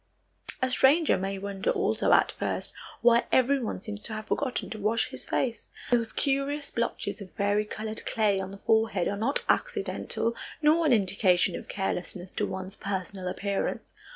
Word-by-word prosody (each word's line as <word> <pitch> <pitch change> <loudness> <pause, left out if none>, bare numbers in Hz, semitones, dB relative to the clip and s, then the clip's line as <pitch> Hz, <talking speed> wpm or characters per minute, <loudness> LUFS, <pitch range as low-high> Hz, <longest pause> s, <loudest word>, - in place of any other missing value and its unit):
A 255 - +2
stranger 290 +5 +5
may 195 +1 -2
wonder 195 0 -3
also - - +1
at - - +5
first - - -3 0.3
why 235 0 +5
everyone 260 -5 +2
seems 205 0 -6
to 220 - -6
have 215 0 -5
forgotten 265 -3 -1
to 220 - -5
wash 215 +3 +1
his - - -7
face. 235 -4 -1 0.2
Those 230 -2 +2
curious 280 +1 0
blotches 225 -3 -2
of 190 - -9
varicolored 210 +2 -1
clay 210 -3 +2
on 190 0 -4
the 195 - -8
forehead 220 -3 +2
are 200 - -1
not 230 +8 0
accidental 360 - 0 0.2
nor 315 +2 +4
an - - +3
indication 190 -3 +3
of - - -7
carelessness 190 -1 -4
to - - -1
one's 190 0 -5
personal 190 -1 -4
appearance. 200 +2 -2
215 Hz, 160 wpm, -28 LUFS, 195-245 Hz, 0.3 s, stranger